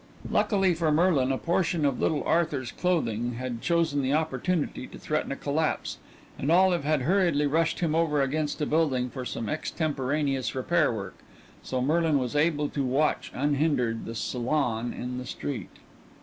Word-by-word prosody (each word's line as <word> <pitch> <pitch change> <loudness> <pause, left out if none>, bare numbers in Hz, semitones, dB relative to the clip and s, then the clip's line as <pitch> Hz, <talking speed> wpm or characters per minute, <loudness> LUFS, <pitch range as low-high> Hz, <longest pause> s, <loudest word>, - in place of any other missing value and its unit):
Luckily 195 -4 +3
for 165 -1 +1
Merlin 150 -5 +3
a 135 - 0
portion 170 -1 0
of 140 -3 0
little 150 -4 +1
Arthur's 150 -7 0
clothing 120 -10 0
had 120 -1 -4
chosen 165 -4 +1
the 135 +1 0
opportunity 155 -1 -1
to - - -11
threaten 155 -2 -2
a - - -1
collapse, 155 +3 -1 0.4
and 140 - 0
Olive 180 -2 +4
had 150 -2 +1
hurriedly 170 -3 +2
rushed 160 +3 +1
him 165 -3 +1
over 160 -2 +2
against 150 +3 -1
a - - +2
building 135 -6 +1
for 130 -2 -6
some 115 -2 -4
extemporaneous 145 -3 -1
repair 155 +3 +2
work, 105 -4 -6 0.4
so 130 -1 -2
Merlin 160 +1 +2
was 125 0 -2
able 150 -1 +2
to 140 - -2
watch, 135 +4 0
unhindered, 140 -5 0
the 115 - -6
salon 120 -1 -1
in 125 +1 -5
the 125 - -6
street. 140 -1 -5
145 Hz, 165 wpm, -27 LUFS, 130-160 Hz, 0.4 s, Olive